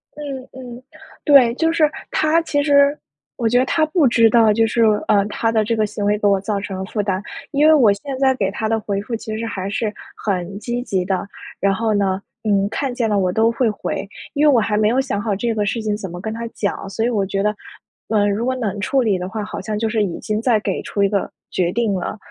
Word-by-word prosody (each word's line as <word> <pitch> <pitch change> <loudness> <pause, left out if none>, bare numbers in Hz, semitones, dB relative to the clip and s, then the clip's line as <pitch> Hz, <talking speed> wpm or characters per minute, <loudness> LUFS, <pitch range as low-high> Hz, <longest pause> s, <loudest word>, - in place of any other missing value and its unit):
嗯 285 -3 -6
嗯， 250 -1 -10 0.4
对， 260 -5 +6
就 325 +2 +1
是 315 -2 +3 0.2
他 315 +2 +2
其 290 -3 0
实 285 0 +4 0.4
我 230 - -1
觉 245 +2 +3
得 255 - +2
他 310 +3 +2
不 310 -2 +2
知 230 -2 +5
道 225 -1 +5
就 225 +2 +3
是， 230 +1 +1 0.2
呃， 200 -1 +4
他 225 +2 -1
的 220 -1 +2
这 230 +2 0
个 215 -1 +1
行 205 0 -5
为 210 0 +2
给 210 - -3
我 200 -1 +3
造 205 0 -2
成 195 -1 -5
了 - - -3
负 210 +1 -2
担。 190 -1 -1 0.3
因 295 +1 +4
为 315 - +7
我 230 -9 +5
现 265 +6 -6
在 265 -1 +4
给 195 -5 0
他 220 +2 -3
的 225 0 +1
回 200 -2 -2
复 230 +3 -4
其 220 -1 -5
实 230 - -3
还 195 -3 -4
是 210 +1 -2 0.2
很 195 -1 -3
积 240 +2 -3
极 190 -7 -1
的， 190 0 -2 0.3
然 195 0 +2
后 220 +1 0
呢， 195 -2 +1 0.2
嗯， 200 -2 +2
看 260 +3 -2
见 240 -2 0
了 205 -1 +2
我 185 -1 +1
都 225 +3 +3
会 235 0 +1
回。 205 -1 -4 0.3
因 290 +1 +2
为 - - +7
我 250 - +4
还 215 -1 0
没 210 0 +3
有 250 +4 +2
想 255 -7 -1
好 205 -2 -1
这 230 +2 -1
个 210 -1 -1
事 220 +3 -1
情 210 -1 0
怎 200 -3 -6
么 175 +1 -7
跟 220 +4 -4
他 230 +1 -5
讲， 200 -3 -4
所 220 +4 -1
以 - - +2
我 210 -5 0
觉 195 +1 -2
得， 210 0 +1 0.5
呃， 210 -2 +2
如 205 +3 -1
果 260 0 0
冷 210 -5 -3
处 270 +5 +1
理 200 -5 +1
的 180 +1 -4
话， 215 0 -4
好 - - -6
像 215 -1 -3
就 225 +1 0
是 215 -1 +1
已 180 -4 -3
经 215 +1 -2
在 235 -3 +3
给 - - -2
出 200 - -1
一 195 - +3
个 200 -1 -1 0.2
决 175 -1 0
定 225 -1 0
了。 190 +3 -3
220 Hz, 280 characters per minute, -20 LUFS, 200-245 Hz, 0.5 s, 为